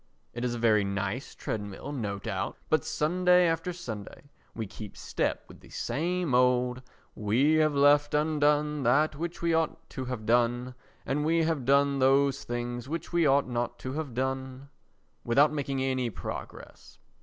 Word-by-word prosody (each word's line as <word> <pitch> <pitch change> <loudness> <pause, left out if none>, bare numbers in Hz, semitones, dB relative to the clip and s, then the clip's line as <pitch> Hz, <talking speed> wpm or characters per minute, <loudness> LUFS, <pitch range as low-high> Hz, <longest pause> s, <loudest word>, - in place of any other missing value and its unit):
It 120 - -5
is 120 -1 -1
a - - -4
very 110 -3 +3
nice 100 +5 -3
treadmill 105 +5 -5
no 105 -8 -3
doubt, 100 - -4
but 155 -3 +3
Sunday 180 +3 +3
after 165 +1 0
Sunday 140 - -8 0.2
we 110 - -3
keep 105 +1 -10
step - - -2
with - - -14
the - - -17
same 175 -1 -2
old 125 0 +2 0.3
"We 125 +9 +2
have 155 -2 +3
left 145 +1 +4
undone 150 -1 +2
that 140 +5 +3
which 170 +3 -5
we 170 -1 +2
ought 160 -1 -1
to 130 - -5
have 125 -4 -5
done; 120 +2 +1 0.3
And 150 +2 -1
we 165 +1 +2
have 160 -6 -1
done 140 +1 +3
those 135 +1 +3
things 120 +1 -4
which 165 +2 -5
we 170 -3 +3
ought 140 0 +3
not 120 -1 -2
to 130 - -3
have 145 -5 -4
done" 130 +1 -3 0.5
without 140 +6 +4
making 135 -2 -2
any 130 -2 0
progress. - - -8
135 Hz, 165 wpm, -28 LUFS, 120-150 Hz, 0.5 s, left